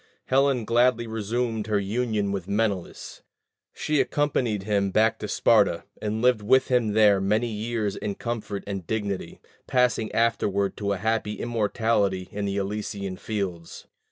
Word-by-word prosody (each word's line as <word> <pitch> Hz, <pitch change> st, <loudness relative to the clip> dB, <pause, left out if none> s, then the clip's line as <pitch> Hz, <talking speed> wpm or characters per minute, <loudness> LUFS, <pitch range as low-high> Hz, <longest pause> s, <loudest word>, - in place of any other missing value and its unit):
Helen 135 Hz, -3 st, +2 dB
gladly 120 Hz, +1 st, +3 dB
resumed 110 Hz, 0 st, -2 dB
her 105 Hz, -1 st, +1 dB
union 105 Hz, 0 st, -1 dB
with 95 Hz, -3 st, -4 dB
Menelaus; 100 Hz, -3 st, -2 dB, 0.5 s
she 150 Hz, -2 st, 0 dB
accompanied 125 Hz, -7 st, 0 dB
him 100 Hz, -1 st, +1 dB
back 110 Hz, +3 st, +2 dB
to -, -, -4 dB
Sparta, -, -, +3 dB, 0.2 s
and 110 Hz, +2 st, -2 dB
lived 125 Hz, -3 st, +4 dB
with 130 Hz, +5 st, +3 dB
him 120 Hz, -4 st, +2 dB
there 105 Hz, -2 st, +5 dB
many 105 Hz, +5 st, +1 dB
years 110 Hz, -1 st, -2 dB
in 100 Hz, -1 st, -3 dB
comfort 110 Hz, -4 st, -4 dB
and 95 Hz, -4 st, -5 dB
dignity, 100 Hz, -4 st, -3 dB, 0.3 s
passing 120 Hz, -3 st, +1 dB
afterward 100 Hz, -4 st, +1 dB
to 100 Hz, -1 st, -1 dB
a -, -, -3 dB
happy 110 Hz, +1 st, -1 dB
immortality 105 Hz, -4 st, 0 dB
in 100 Hz, 0 st, -3 dB
the 100 Hz, 0 st, -2 dB
Elysian 100 Hz, -1 st, -3 dB
fields. 90 Hz, -5 st, -5 dB
105 Hz, 145 wpm, -25 LUFS, 100-115 Hz, 0.5 s, there